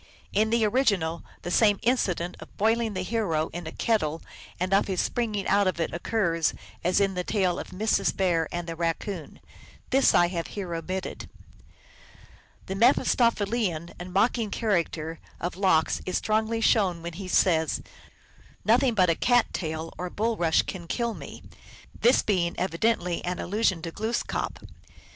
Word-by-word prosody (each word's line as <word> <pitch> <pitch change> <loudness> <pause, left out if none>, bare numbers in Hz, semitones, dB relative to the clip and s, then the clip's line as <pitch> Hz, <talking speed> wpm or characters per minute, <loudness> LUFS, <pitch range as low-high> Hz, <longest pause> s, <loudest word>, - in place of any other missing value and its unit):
In 215 +2 +3
the 230 -1 +3
original, 200 -9 +1 0.2
the 175 - -4
same 205 0 +4
incident 180 -8 0
of - - -13
boiling 225 0 +1
the 185 - -2
hero 185 -8 0
in 175 -1 -6
a - - -5
kettle 165 -9 0 0.4
and 185 +2 0
of 195 - +3
his 190 -3 -1
springing 215 -5 -1
out 200 -1 +3
of 185 -2 -1
it 165 - -1
occurs 170 -3 0 0.3
as 180 +3 +2
in 195 -1 +2
the 180 -1 -2
tale 185 -3 0
of - - -6
Mrs. 215 +4 0
Bear 170 -4 +2
and 175 0 -3
the 165 -1 -5
Raccoon. 170 +1 -3 0.5
This 270 +1 +4
I 175 0 +5
have 170 -2 -3
here 185 -4 -3
omitted. 185 +3 -4 1.4
The 190 - -4
Mephistophelian 215 - +2
and 180 +1 -7
mocking 220 +3 +2
character 170 -7 -1 0.2
of 175 0 -3
Lox 185 -5 +2
is 185 - 0
strongly 220 +1 0
shown 185 -7 +2
when 170 0 -5
he 190 +2 -7
says, 160 -4 +2 0.4
" - - -28
Nothing 240 +3 +4
but 180 -4 +4
a - - +3
cat 245 +7 +2
tail 160 -1 -4
or 180 0 -3
bulrush 205 -6 +1
can 175 -3 -7
kill 235 +4 -1
me," - - -10 0.6
this 240 +3 +4
being 180 -5 0
evidently 180 -1 0
an 180 0 -2
allusion 195 -3 0
to 165 - -4
Glooskap. 220 +6 -3
185 Hz, 160 wpm, -26 LUFS, 170-220 Hz, 1.4 s, I